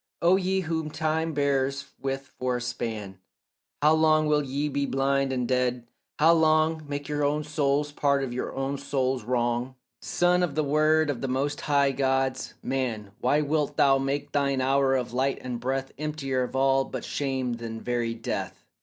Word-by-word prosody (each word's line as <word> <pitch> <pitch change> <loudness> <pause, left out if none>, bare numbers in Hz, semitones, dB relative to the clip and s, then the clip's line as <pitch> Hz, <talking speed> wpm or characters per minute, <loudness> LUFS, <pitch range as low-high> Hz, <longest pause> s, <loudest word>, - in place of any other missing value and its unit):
O 175 +2 +5
ye 190 0 +1
whom 160 -2 -2
time 160 +1 -1
but 160 - -6
bears 140 -1 0 0.2
with 135 0 -4
for 125 -1 0
a - - -6
span, 110 -5 -4 0.6
How 155 +1 +6
long 155 -1 +4
will 150 -1 +3
ye 140 +1 -2
be 140 -1 -1
blind 135 0 +1
and 125 -2 -1
dead, 125 -1 0 0.3
how 160 +3 +6
long 155 0 +3
Make 145 0 -4
your 145 -1 -1
own 150 +1 +1
souls 145 -1 0
part 140 -1 +1
of 125 -2 -4
your 125 - -3
own 135 +1 -2
soul's 130 -3 -1
wrong? 120 +1 -1 0.3
Son 180 0 +2
of 165 -6 -1
the 155 - +1
word 155 +1 +3
of 130 - -6
the 135 - -1
most 140 +3 -1
high 140 -2 +2
gods, 135 -1 0
man, 115 -6 -2
Why 145 +4 +2
wilt 150 0 -1
thou 135 -1 +5
make 140 +1 -2
thine 140 -2 +1
hour 135 +1 +2
of 125 -2 -2
light 135 +2 +1
and 125 -2 -4
breath 135 +2 -2
Emptier 145 -4 -2
of 125 +1 -3
all 135 0 +3
but - - -6
shame 130 -4 -2
than 115 -1 -6
very 120 -1 -2
death? 115 - -5
140 Hz, 185 wpm, -26 LUFS, 130-150 Hz, 0.6 s, How